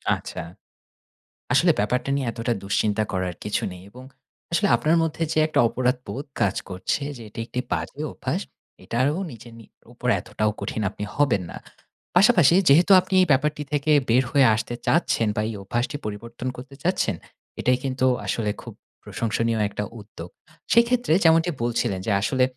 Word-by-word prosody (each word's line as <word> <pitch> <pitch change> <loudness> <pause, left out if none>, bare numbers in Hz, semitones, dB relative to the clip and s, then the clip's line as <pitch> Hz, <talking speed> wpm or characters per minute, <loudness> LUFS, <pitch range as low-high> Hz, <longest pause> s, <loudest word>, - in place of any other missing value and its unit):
আচ্ছা। - - -7 1.1
আসলে - - +4
ব্যাপারটা 125 +6 0
নিয়ে 135 -2 -2
এতটা 115 +1 -2
দুশ্চিন্তা 105 +2 0
করার 95 -1 -2
কিছু 105 - -1
নেই 90 0 -11
এবং 125 +4 -12 0.5
আসলে 200 +4 +2
আপনার 160 +2 +2
মধ্যে 165 0 -2
যে, - - 0
একটা 155 - +2
অপরাধবোধ 130 +3 -2 0.2
কাজ 100 -4 +2
করছে 95 +9 -2
যে 120 - -10
"এটি 105 - -8
একটি 125 - -3
বাজে - - -3
অভ্যাস", - - -3 0.4
এটাও 135 +8 0
নিজের 120 0 -12
নি 115 - -13 0.3
ওপর - - -5
এতটাও 110 0 -1
কঠিন 110 - -3
আপনি 105 - -6
হবেন 135 -10 +2
না। - - -9 0.6
পাশাপাশি 180 - +6
যেহেতু 170 +8 +5
আপনি 185 +1 -7
এই 185 - +3
ব্যাপারটি 150 +2 +1
থেকে 145 +1 +1 0.2
বের 125 +3 +4
হয়ে 140 -2 +5
আসতে 115 +2 -4
চাচ্ছেন 145 -8 +2
বা 105 - 0
এই - - -4
অভ্যাসটি 120 +8 -2
পরিবর্তন 115 +4 -6
করতে 135 +2 -10
চাচ্ছেন, 180 +2 +1 0.4
এটাই 125 0 +2
কিন্তু 130 -1 0 0.2
আসলে 105 -3 -1
খুব - - -10 0.3
প্রশংসনীয় 115 0 -1
একটা 105 - -4 0.2
উদ্যোগ। 90 -5 -10 0.4
সে 235 - +7
ক্ষেত্রে 245 -8 +1
যেমনটি 165 +1 +4
বলছিলেন, 120 -5 0
যে 110 - +2
আসলে 130 +5 +1
125 Hz, 160 wpm, -24 LUFS, 110-150 Hz, 1.1 s, সে